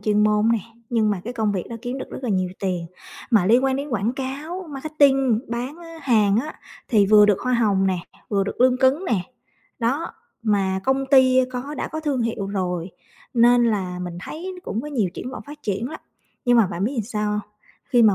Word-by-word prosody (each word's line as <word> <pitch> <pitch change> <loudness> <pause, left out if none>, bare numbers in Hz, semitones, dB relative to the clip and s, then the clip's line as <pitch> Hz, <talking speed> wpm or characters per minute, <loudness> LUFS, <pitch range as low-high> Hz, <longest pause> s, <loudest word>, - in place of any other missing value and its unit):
chuyên 210 0 +2
môn 210 +1 +3
nè, 230 - +2 0.3
nhưng 220 -3 +2
mà 195 -3 -1
cái 240 - -4
công 220 -3 0
việc 185 -3 -2
đó 230 - -6
kiếm 250 +2 -4
được - - -7
rất - - -6
là 250 - -2
nhiều 185 -3 +1
tiền, 180 -3 -2 0.4
mà 210 -6 +4
liên 240 +6 +5
quan 265 0 +2
đến 280 +2 -4
quảng 230 -2 0
cáo, 290 +8 -5
marketing, 270 -5 +2
bán, 245 +6 -4
á, 330 -1 -11
hàng 215 -6 +3
á 305 +3 -8 0.3
thì 210 -5 +4
vừa 210 0 +7
được 200 -2 +2
hoa 255 - -1
hồng 205 -5 +2
nè, 185 -2 +1 0.3
vừa 200 -2 +1
được 200 - -6
lương 255 0 +5
cứng 270 +7 +3
nè, 215 - +1 0.6
đó, 265 +8 -1 0.3
mà 195 -3 +1
công 270 +1 +1
ty 260 -1 +6
có 260 +4 -4
đã - - -3
có 315 - -5
thương 285 -6 0
hiệu 225 -3 -2
rồi 180 -3 -2 0.4
nên 240 0 +5
là 190 -6 -1
mình 175 -1 -5
thấy 360 - -6
cũng 225 - -3
có 280 - -7
nhiều 230 -10 0
triển 250 - -6
vọng - - -7
phát 295 +1 -11
triển 210 +4 -2
lắm. 315 - -8 0.4
Nhưng 245 0 +4
mà 225 -4 +5
bạn 175 +2 -3
biết 245 +2 -1
sao? 210 -2 -1 0.4
Khi 245 -4 +3
mà 215 -3 +6
235 Hz, 220 wpm, -23 LUFS, 205-265 Hz, 0.6 s, vừa